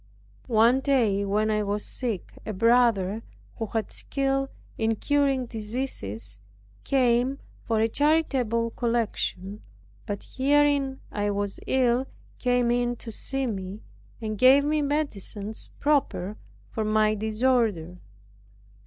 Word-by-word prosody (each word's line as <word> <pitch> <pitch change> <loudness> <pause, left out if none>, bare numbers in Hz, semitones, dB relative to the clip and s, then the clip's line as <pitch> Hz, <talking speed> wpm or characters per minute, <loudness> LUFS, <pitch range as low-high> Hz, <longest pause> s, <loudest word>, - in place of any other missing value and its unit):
One 235 +2 +4
day 235 -8 +2
when 210 +2 +1
I 210 0 +1
was 205 0 -2
sick, 230 -8 -4
a 215 - -4
brother 225 -2 +3 0.4
who 225 - -3
had 220 -1 -2
skill 270 0 -1 0.3
in 225 0 +1
curing 275 0 +1
diseases, 210 - -4 0.4
came 255 0 +2 0.3
for 225 -1 +1
a 225 - +3
charitable 255 -5 +1
collection, 215 -4 -2 0.5
but 205 -1 -4
hearing 280 0 +2
I 205 0 -1
was 200 -1 -2
ill, 255 0 +2 0.3
came 245 -1 +2
in 245 0 +1
to 230 - -8
see 270 +5 -2
me, 195 -3 -4 0.4
and 215 -2 -4
gave 270 +3 +7
me 305 0 +1
medicines 220 -8 -3
proper 275 -9 +1 0.4
for 220 - -2
my 215 0 +3
disorder. 215 -5 0
230 Hz, 120 wpm, -26 LUFS, 210-265 Hz, 0.5 s, gave